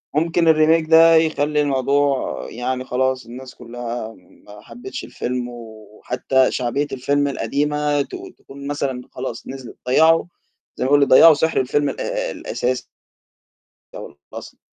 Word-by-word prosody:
ممكن 165 +2 +1
الRemake 155 +1 +2
ده 165 0 +7
يخلّي 150 -2 +1
الموضوع 140 0 0
يعني 130 +2 -3
خلاص، 130 +1 -1
الناس 125 +2 -11
كلّها 120 -1 -7
ما 100 +3 -17
حبتش 115 +3 -9
الفيلم، 125 0 -4
وحتى 115 +3 -2
شعبية 135 +4 -2
الفيلم 140 +2 0
القديمة 145 +3 -1
ت - - -6 0.2
تكون 140 +1 -11
مثلًا 140 -3 -3
خلاص 125 -2 -7
نزلت. 130 -2 -9
ضيّعوا 160 +6 +4 0.5
زَي - - -2
ما - - 0
يقول 145 0 +4
لك، 140 - +4
ضيّعوا 160 +6 +8
سِحر 160 +1 0
الفيلم 140 +3 0
الأ - - -3
الأساسي. 125 +1 -3 1.1
أو - - -7 0.3
الأصلي. - - -10
135 Hz, 135 wpm, -20 LUFS, 125-150 Hz, 1.1 s, ضيّعوا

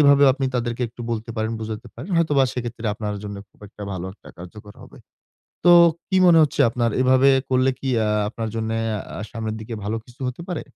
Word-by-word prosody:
এভাবেও 140 -1 +6
আপনি 135 0 -2
তাদেরকে 120 0 -2
একটু 120 - -15
বলতে 115 0 -3
পারেন, 110 +1 -1
বুঝাতে 110 +1 -6
পারেন। 130 +10 -9
হয়তোবা 150 -5 +3
সেক্ষেত্রে 120 -1 -5
আপনার 105 -1 -4
জন্য 100 -1 -6
খুব - - -31
একটা 105 - -12
ভালো 95 -1 -5
একটা - - -17
কার্যকর 105 +4 -11
হবে। - - -15 0.7
তো 175 - +7 0.4
কি 190 - +1
মনে 170 -2 +7
হচ্ছে 150 -1 0
আপনার 120 0 0
এভাবে 130 +1 +5 0.2
করলে 130 +1 +3
কি 135 - -4 0.2
আ - - 0 0.2
আপনার 115 0 -4
জন্যে 110 0 -2 0.4
আ - - -5
সামনের 110 -2 -4
দিকে 110 +1 -6
ভালো 105 +2 -2
কিছু 125 +1 -19
হতে 125 +7 -6
পারে? 175 -4 -3
120 Hz, 200 wpm, -22 LUFS, 110-135 Hz, 0.7 s, তো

